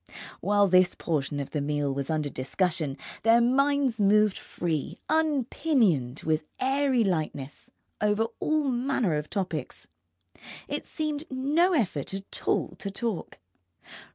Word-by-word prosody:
While 205 0 +3
this 185 -1 +4
portion 145 -3 -2
of 140 - -5
the 150 - -1
meal 145 -1 -1
was 135 0 -4
under 155 -2 0
discussion 150 +2 -1 0.2
their 225 +1 +5
minds 265 -1 +2
moved 210 0 +4
free, 160 -4 -3
unpinioned, 260 - +1
with 155 0 0 0.2
airy 265 -2 +2
lightness, 155 -7 -3 0.3
over 210 +1 +2
all 305 -2 +1
manner 245 - 0
of 150 0 -3
topics. 195 -3 -4 0.8
It - - -4
seemed 305 -1 -3
no 295 +8 +2
effort 190 - -1
at 195 0 -5
all - - +2
to 200 - -4
talk. 215 -1 -4
205 Hz, 125 wpm, -27 LUFS, -, 0.8 s, their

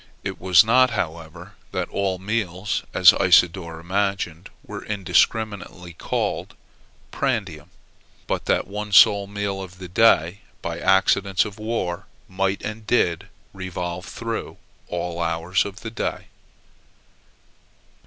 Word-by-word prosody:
It - - -5
was 90 -2 +6
not, 130 +3 +5
however, 85 0 -5 0.2
that 90 -1 -2
all 95 -2 -1
meals, 100 -1 -2
as - - +7
Isidore 85 -2 +3
imagined, 95 -2 -2 0.2
were - - -7
indiscriminately 100 -2 -1
called - - -3 0.6
prandium; 100 - -2 0.6
but - - -3
that - - +1
the - - -18
one 105 0 -5
sole 100 -1 +6
meal 100 -1 -3
of 90 -1 -10
the 90 0 -8
day, 90 -2 +3 0.2
by - - -4
accidents 95 0 +3
of 105 0 -9
war, 100 -5 -3 0.2
might, 95 +1 -1
and 110 0 -6
did, 90 -6 +1 0.3
revolve 90 -2 -5
through 115 -1 -5 0.3
all 85 0 -4
hours 85 +3 0
of 100 0 -8
the 115 - -6
day. - - -4
95 Hz, 125 wpm, -23 LUFS, 90-105 Hz, 0.6 s, as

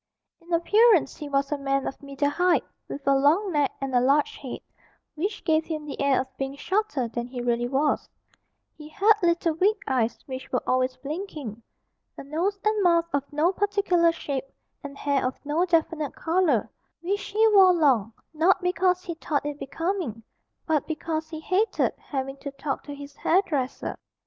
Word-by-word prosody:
In 340 +1 -16
appearance 380 - +4
he 295 - -7
was 275 0 0
a 295 - -1
man 275 0 0
of - - -5
middle 280 0 -1
height, 355 +2 +2 0.2
with 275 0 -8
a 275 - +6
long 310 +9 +3
neck 290 -4 +2
and 270 -1 -4
a 250 - +5
large 280 +3 +2
head, 260 -3 -7 0.5
which 390 +7 -3
gave 320 -1 +3
him 310 -2 -4
the 285 - -6
air 280 -1 +3
of 260 0 -6
being 270 0 -3
shorter 370 - -1
than 235 +1 -4
he 250 0 -7
really 240 0 0
was; 280 +4 0 0.7
he 300 0 -11
had 405 +7 +4
little 340 -1 +2
weak 405 +4 +2
eyes 245 -4 0
which 260 -1 -7
were 250 - 0
always 255 0 +1
blinking, 290 - -6 0.6
a - - -7
nose 345 +8 -1
and 430 -1 +2
mouth 340 -2 +4
of 280 0 -2
no 305 +4 +2
particular 395 -4 +2
shape, 280 -5 -4 0.4
and 280 -1 -8
hair 280 -2 0
of 255 +1 -1
no 310 +5 +1
definite 325 -4 0
colour, 320 - +1 0.3
which 395 +3 -2
he 430 +2 +3
wore 385 -3 +7
long 265 - +3 0.2
not 330 +5 +3
because 365 0 +1
he 340 - -4
thought 300 -3 -2
it 295 0 -4
becoming, 325 - -3 0.4
but 310 -3 0
because 315 0 -3
he 315 -1 -6
hated 375 +7 +1
having 270 -1 -4
to 280 - -6
talk 275 0 -3
to 290 - -8
his 285 0 -10
hairdresser. 300 -8 0
300 Hz, 180 wpm, -26 LUFS, 275-355 Hz, 0.7 s, wore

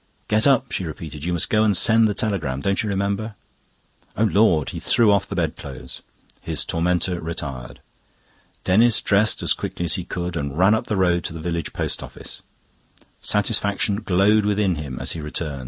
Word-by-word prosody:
"Get 110 +4 +2
up!" 135 -2 +3
she 95 - -2
repeated. 75 -2 -7
"You 90 - -1
must 85 - -1
go 110 0 +4
and 105 -4 +3
send 110 +2 +5
the 105 - -2
telegram. 90 -12 -2
Don't 100 +6 0
you 110 - -3
remember?" 100 +2 -2 0.8
"O 110 - +2
Lord!" 100 -8 +3
He - - -6
threw 115 -3 +3
off 100 -2 +2
the - - -4
bed - - -1
clothes; 70 -2 -9 0.4
his - - -1
tormentor 90 +1 0
retired. 70 -7 -6 0.8
Denis 110 +5 +4
dressed 105 +1 +1
as - - +3
quickly 85 - -4
as 85 - +2
he 90 - -4
could 90 0 -4
and 70 -2 -4
ran 95 +4 +5
up 110 - -1
the 105 - -1
road 90 -2 +2
to - - -3
the 80 - -7
village 85 -1 -3
post - - -3
office. - - -10 0.8
Satisfaction 100 -1 +1
glowed 105 +1 +3
within 105 -2 +1
him 75 -5 -6
as - - -1
he 80 - -5
returned. 75 -1 -4
95 Hz, 190 wpm, -22 LUFS, 80-105 Hz, 0.8 s, send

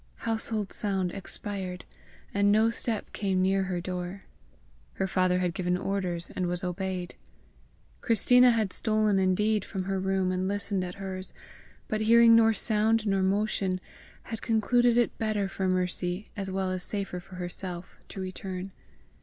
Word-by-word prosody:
Household 220 -2 -1
sound 190 -4 0
expired, 190 -1 -5 0.5
and 200 0 +3
no 220 +2 +4
step 230 -2 -3
came 195 -3 0
near 190 +1 +2
her 185 -2 -2
door. 180 +2 -5 0.7
Her 190 - -1
father 185 -1 +2
had 180 -2 0
given 180 0 0
orders, 180 -3 -2
and 180 - -1
was 175 0 -2
obeyed. 180 0 -3 0.9
Christina 250 +2 +5
has 225 -4 +2
stolen 215 -2 +2
indeed 205 +3 +2
from 190 -1 -4
her 195 +1 -2
own 190 - -3
room 190 -1 +1
and 185 0 -1
listened 200 -1 -1
at 180 0 -6
hers, 190 -1 -4 0.5
but 215 0 -1
hearing 230 +1 +7
nor 225 -1 +6
sound 220 0 +2
nor 195 -2 +1
motion, 195 -1 0 0.4
had 225 -1 -6
concluded 240 +2 +3
it 240 - +2
better 215 -3 0
for 190 0 -2
Mercy 180 +1 -1
as 195 -2 -4
well 190 0 -1
as 185 -1 -2
safer 195 -2 0
for 185 +1 -13
herself, 180 0 -6
to - - -8
return. 185 0 -5
195 Hz, 155 wpm, -28 LUFS, 185-215 Hz, 0.9 s, hearing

